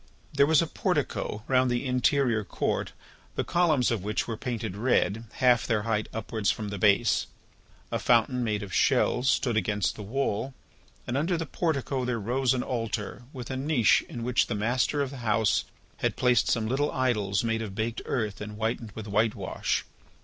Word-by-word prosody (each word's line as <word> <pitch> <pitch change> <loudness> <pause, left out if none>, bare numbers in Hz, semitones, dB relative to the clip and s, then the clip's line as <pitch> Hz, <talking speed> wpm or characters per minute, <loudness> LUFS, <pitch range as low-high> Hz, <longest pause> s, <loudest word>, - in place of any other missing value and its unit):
There 140 0 +4
was 160 +1 +5
a - - -1
portico 105 -8 -2
round 130 -1 +3
the 120 +2 -1
interior 125 -2 +2
court 95 - -2 0.4
the - - 0
columns 155 -9 +2
of 110 -6 -1
which 105 +1 -1
were 115 - -3
painted 115 -6 -4
red, 115 -1 +1
half 125 -2 +3
their 110 -3 +1
height 110 -1 -1
upwards 110 -1 -2
from 105 -2 -2
the 100 -1 -5
base. 100 0 +3 0.6
A - - 0
fountain 125 +1 +3
made 105 -2 -1
of 95 -2 -8
shells 125 +2 +3
stood 120 -4 +1
against 105 -3 0
the - - -8
wall 130 +3 -2 0.5
and 120 - -3
under 165 +5 +1
the 165 - -3
portico 140 -5 -1
there 125 -2 -1
rose 125 +4 +1
an 125 - -1
altar 115 -1 -3
with 130 -2 -7
a - - -2
niche 135 -4 +3
in 120 - -6
which 125 +1 +2
the 115 - -2
master 125 +7 +1
of 135 - -5
the 140 - -8
house 110 -2 +1 0.3
had - - -1
placed 125 -1 +3
some 115 -2 +1
little 135 +6 0
idols 110 -7 0
made 115 -1 0
of 105 -3 -6
baked 110 +2 -2
earth 110 -6 -2
and 105 0 -6
whitened 110 0 -3
with 110 0 -7
whitewash. 105 +2 0
120 Hz, 185 wpm, -27 LUFS, 105-130 Hz, 0.6 s, was